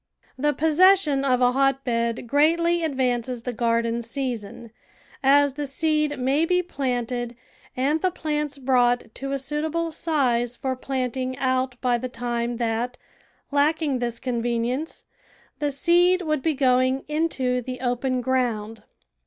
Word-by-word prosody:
The 295 Hz, +3 st, +1 dB
possession 315 Hz, 0 st, +4 dB
of 255 Hz, -2 st, +2 dB
a 245 Hz, 0 st, +5 dB
hotbed 250 Hz, -3 st, 0 dB
greatly 335 Hz, +6 st, +2 dB
advances 250 Hz, -4 st, -1 dB
the 250 Hz, -, -3 dB
garden 230 Hz, 0 st, 0 dB
season, 235 Hz, -2 st, -5 dB, 0.5 s
as 280 Hz, +1 st, +4 dB
the 290 Hz, +1 st, -3 dB
seed 305 Hz, +1 st, 0 dB
may 265 Hz, +5 st, +1 dB
be 360 Hz, +2 st, +2 dB
planted 245 Hz, -6 st, -3 dB, 0.4 s
and 290 Hz, +5 st, +1 dB
the 370 Hz, -, +2 dB
plants 300 Hz, -4 st, -3 dB
brought 245 Hz, -3 st, +1 dB
to 275 Hz, +1 st, -5 dB
a 275 Hz, -, 0 dB
suitable 315 Hz, +4 st, -2 dB
size 245 Hz, -7 st, 0 dB
for 260 Hz, -1 st, -2 dB
planting 255 Hz, 0 st, -3 dB
out 255 Hz, -1 st, 0 dB
by 245 Hz, -2 st, +1 dB
the 255 Hz, -, -4 dB
time 240 Hz, -1 st, -3 dB
that, 235 Hz, +1 st, -2 dB, 0.5 s
lacking 290 Hz, -1 st, +1 dB
this 235 Hz, -1 st, -2 dB
convenience, 240 Hz, +4 st, -2 dB, 0.6 s
the 295 Hz, -1 st, 0 dB
seed 350 Hz, +5 st, +3 dB
would 305 Hz, -3 st, -1 dB
be 315 Hz, +2 st, 0 dB
going 260 Hz, 0 st, +2 dB
into 280 Hz, -5 st, 0 dB
the 255 Hz, +1 st, -6 dB
open 250 Hz, +1 st, -1 dB
ground. 230 Hz, -4 st, -1 dB
260 Hz, 135 wpm, -24 LUFS, 245-295 Hz, 0.6 s, a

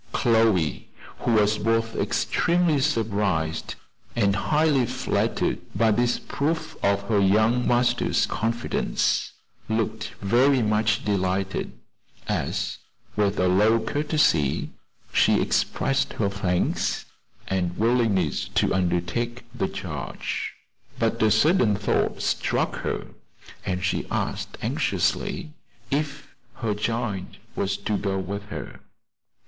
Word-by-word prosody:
Chloe, 110 Hz, -, +2 dB, 0.3 s
who 120 Hz, -, +1 dB
was 105 Hz, 0 st, +3 dB
both 115 Hz, +1 st, 0 dB
extremely 170 Hz, -3 st, +1 dB
surprised 100 Hz, -, 0 dB, 0.4 s
and 100 Hz, -4 st, +2 dB
highly 150 Hz, +2 st, +2 dB
flattered -, -, 0 dB, 0.2 s
by 110 Hz, +2 st, +3 dB
this 120 Hz, +3 st, +2 dB
proof 160 Hz, +3 st, -2 dB
of 100 Hz, 0 st, +2 dB
her 105 Hz, 0 st, +1 dB
young 110 Hz, +5 st, +3 dB
master's 120 Hz, 0 st, +2 dB
confidence, 115 Hz, +2 st, -1 dB, 0.4 s
looked 110 Hz, +1 st, -2 dB
very 125 Hz, +6 st, +3 dB
much 105 Hz, 0 st, +1 dB
delighted, 95 Hz, -1 st, -1 dB, 0.5 s
as, -, -, -2 dB, 0.4 s
with 105 Hz, -1 st, +1 dB
a 90 Hz, -, +3 dB
low 105 Hz, +5 st, +4 dB
courtesy, 115 Hz, -, +1 dB, 0.4 s
she -, -, +4 dB
expressed 135 Hz, 0 st, 0 dB
her 100 Hz, -3 st, 0 dB
thanks, 90 Hz, -3 st, 0 dB, 0.4 s
and 95 Hz, -2 st, 0 dB
her -, -, -13 dB
willingness 110 Hz, -, +1 dB
to -, -, +1 dB
undertake 95 Hz, +7 st, -1 dB
the 115 Hz, -6 st, -1 dB
charge. -, -, -4 dB, 0.4 s
But -, -, 0 dB
a 110 Hz, -, +5 dB
sudden 135 Hz, -, +4 dB
thought 105 Hz, +1 st, 0 dB
struck -, -, 0 dB
her, -, -, -3 dB, 0.6 s
and 90 Hz, -2 st, -2 dB
she 90 Hz, -, -1 dB
asked -, -, -3 dB
anxiously 155 Hz, -, -1 dB, 0.4 s
if 150 Hz, +1 st, -2 dB, 0.2 s
"her 115 Hz, -3 st, -1 dB
child" 105 Hz, -2 st, -3 dB, 0.2 s
was 100 Hz, 0 st, -1 dB
to 100 Hz, +1 st, -1 dB
go 95 Hz, -1 st, -1 dB
with 100 Hz, +2 st, -4 dB
her. -, -, -7 dB
110 Hz, 110 wpm, -25 LUFS, 100-120 Hz, 0.6 s, a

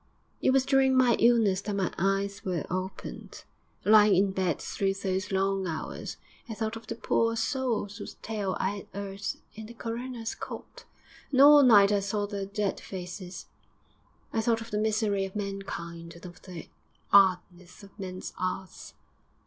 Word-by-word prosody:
'It -, -, +3 dB
was 260 Hz, 0 st, +3 dB
during 270 Hz, -1 st, +4 dB
my 250 Hz, -2 st, +5 dB
illness 225 Hz, -5 st, +4 dB
that 205 Hz, 0 st, -3 dB
my 195 Hz, -2 st, -1 dB
eyes 195 Hz, +2 st, -1 dB
were 180 Hz, -5 st, -2 dB
opened. 185 Hz, +1 st, -6 dB, 0.4 s
Lying 210 Hz, -1 st, +7 dB
in 195 Hz, +1 st, +3 dB
bed 185 Hz, -5 st, 0 dB
through 195 Hz, -1 st, -1 dB
those 190 Hz, 0 st, -2 dB
long 195 Hz, 0 st, 0 dB
hours 160 Hz, -2 st, -5 dB, 0.3 s
I 220 Hz, -, -4 dB
thought 220 Hz, +1 st, -3 dB
of 225 Hz, -1 st, -10 dB
the 230 Hz, -, -4 dB
poor 230 Hz, 0 st, +1 dB
souls 225 Hz, -4 st, -1 dB
whose -, -, -8 dB
tale 205 Hz, -4 st, -3 dB
I 200 Hz, +2 st, -1 dB
'ad -, -, -13 dB
'eard 200 Hz, 0 st, -6 dB, 0.3 s
in 220 Hz, 0 st, -9 dB
the 235 Hz, -, -12 dB
coroner's 235 Hz, 0 st, -4 dB
court. 485 Hz, -1 st, -9 dB, 0.5 s
And 260 Hz, -, +1 dB
all 290 Hz, +1 st, +9 dB
night 210 Hz, -6 st, +7 dB
I 205 Hz, -, +3 dB
saw 205 Hz, +1 st, -1 dB
their 200 Hz, -1 st, -4 dB
dead 205 Hz, 0 st, -2 dB
faces. 180 Hz, 0 st, -7 dB, 0.9 s
I 225 Hz, -, +1 dB
thought 230 Hz, 0 st, +1 dB
of 230 Hz, +1 st, -9 dB
the 210 Hz, -, 0 dB
misery 215 Hz, -2 st, +1 dB
of 195 Hz, +1 st, -6 dB
mankind 170 Hz, -5 st, -5 dB
and 170 Hz, -, -13 dB
of 180 Hz, 0 st, -11 dB
the 180 Hz, -3 st, -9 dB, 0.5 s
'ardness 180 Hz, -1 st, +3 dB
of 200 Hz, +1 st, -16 dB
men's 185 Hz, -1 st, -6 dB
'earts.... 185 Hz, 0 st, -4 dB
200 Hz, 165 wpm, -28 LUFS, 190-225 Hz, 0.9 s, all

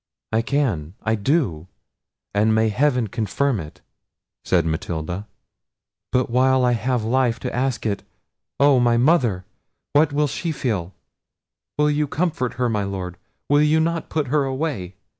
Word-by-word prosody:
"I 110 Hz, +1 st, +2 dB
can, 115 Hz, -, -1 dB
I 110 Hz, -, +1 dB
do; 100 Hz, -, 0 dB, 0.7 s
and 110 Hz, +2 st, +3 dB
may 110 Hz, 0 st, +3 dB
heaven 125 Hz, +2 st, +2 dB
confirm 115 Hz, +4 st, -1 dB
it!" 80 Hz, -3 st, -9 dB, 0.6 s
said 85 Hz, -3 st, +2 dB
Matilda; 85 Hz, +3 st, -3 dB, 0.8 s
"but 125 Hz, 0 st, +2 dB
while 130 Hz, +1 st, +3 dB
I 125 Hz, -, +3 dB
have 120 Hz, 0 st, 0 dB
life 120 Hz, 0 st, +1 dB
to -, -, -4 dB
ask 125 Hz, -3 st, -1 dB
it—oh! 130 Hz, +6 st, -1 dB
my 120 Hz, -1 st, +3 dB
mother! 120 Hz, -, +2 dB, 0.5 s
what 145 Hz, +1 st, +4 dB
will 150 Hz, +1 st, +2 dB
she 145 Hz, +6 st, -3 dB
feel? 100 Hz, -, -2 dB, 0.8 s
Will 150 Hz, 0 st, +3 dB
you 150 Hz, 0 st, 0 dB
comfort 150 Hz, -6 st, -1 dB
her, 125 Hz, +1 st, 0 dB
my 105 Hz, -3 st, 0 dB
Lord? 95 Hz, -3 st, -4 dB, 0.3 s
Will 145 Hz, +1 st, +4 dB
you 150 Hz, +1 st, +4 dB
not 165 Hz, 0 st, -1 dB
put 150 Hz, -5 st, -1 dB
her 145 Hz, +1 st, +2 dB
away? 130 Hz, -, -3 dB
125 Hz, 145 wpm, -22 LUFS, 100-145 Hz, 0.8 s, what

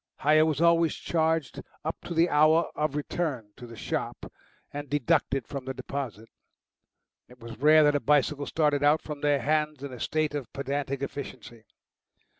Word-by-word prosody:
Hire 155 Hz, +2 st, +4 dB
was 155 Hz, -3 st, -1 dB
always 170 Hz, -1 st, +3 dB
charged 160 Hz, -3 st, -1 dB, 0.2 s
up 160 Hz, -, -4 dB
to 170 Hz, -, -5 dB
the 165 Hz, +2 st, +4 dB
hour 155 Hz, +2 st, +3 dB
of 150 Hz, -1 st, -2 dB
return 145 Hz, -7 st, -3 dB
to 120 Hz, -, -11 dB
the 115 Hz, -, -11 dB
shop -, -, -4 dB, 0.4 s
and 145 Hz, -1 st, -6 dB
deducted 135 Hz, -2 st, +1 dB
from 140 Hz, -3 st, -7 dB
the 130 Hz, 0 st, -5 dB
deposit. 120 Hz, -6 st, -6 dB, 1.0 s
It 125 Hz, 0 st, -18 dB
was 115 Hz, -1 st, -10 dB
rare 155 Hz, +2 st, +6 dB
that 145 Hz, 0 st, +4 dB
a 145 Hz, -, +1 dB
bicycle 145 Hz, 0 st, +1 dB
started 150 Hz, -3 st, +1 dB
out 145 Hz, +2 st, +3 dB
from 150 Hz, -2 st, -7 dB
their 145 Hz, -2 st, +2 dB
hands 150 Hz, -1 st, 0 dB
in 140 Hz, -2 st, -6 dB
a 125 Hz, -, -9 dB
state 155 Hz, +2 st, -1 dB
of 140 Hz, -5 st, -5 dB
pedantic 140 Hz, 0 st, -3 dB
efficiency. 125 Hz, -5 st, -8 dB
145 Hz, 170 wpm, -27 LUFS, 135-155 Hz, 1.0 s, rare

